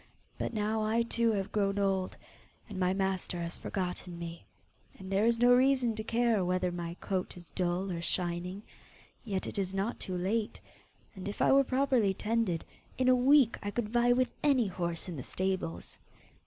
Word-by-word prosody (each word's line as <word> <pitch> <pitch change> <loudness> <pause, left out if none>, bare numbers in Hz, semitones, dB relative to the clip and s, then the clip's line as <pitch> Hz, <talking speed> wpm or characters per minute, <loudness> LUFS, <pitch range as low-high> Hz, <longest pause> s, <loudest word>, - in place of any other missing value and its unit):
But - - -2
now 215 0 0
I 220 +2 +2
too 230 0 +1
have 195 -2 -2
grown 200 -1 +1
old, 195 -2 0 0.5
and 205 -5 -6
my 180 0 +2
master 190 -2 -1
has 170 0 -3
forgotten 180 -2 -4
me, 170 -3 -7 0.5
and 190 0 -9
there 200 +3 +3
is 235 0 +3
no 245 +1 +6
reason 255 -2 +4
to 215 - -4
care 230 -3 +2
whether 180 0 0
my 170 -1 -5
coat 185 -2 -3
is 175 -2 -13
dull 180 +1 -1
or 170 -1 -3
shining. 180 +3 -2 0.6
Yet, 195 -5 -2
it - - -4
is 190 0 -2
not 200 +5 -1
too 185 -1 -4
late, 210 +5 -1 0.6
and 190 0 -7
if 205 - -5
I - - +4
were 275 0 +6
properly 255 -7 +2
tended, 215 -6 0 0.3
in 255 0 +3
a 255 - +7
week 255 -1 +5
I 205 - -3
could 210 +1 -2
vie 240 +1 +3
with 255 +1 +2
any 275 -5 +3
horse 175 -3 -3
in 175 -4 -5
the 130 - -5
stables! 185 -3 -3
195 Hz, 185 wpm, -31 LUFS, 180-230 Hz, 0.6 s, a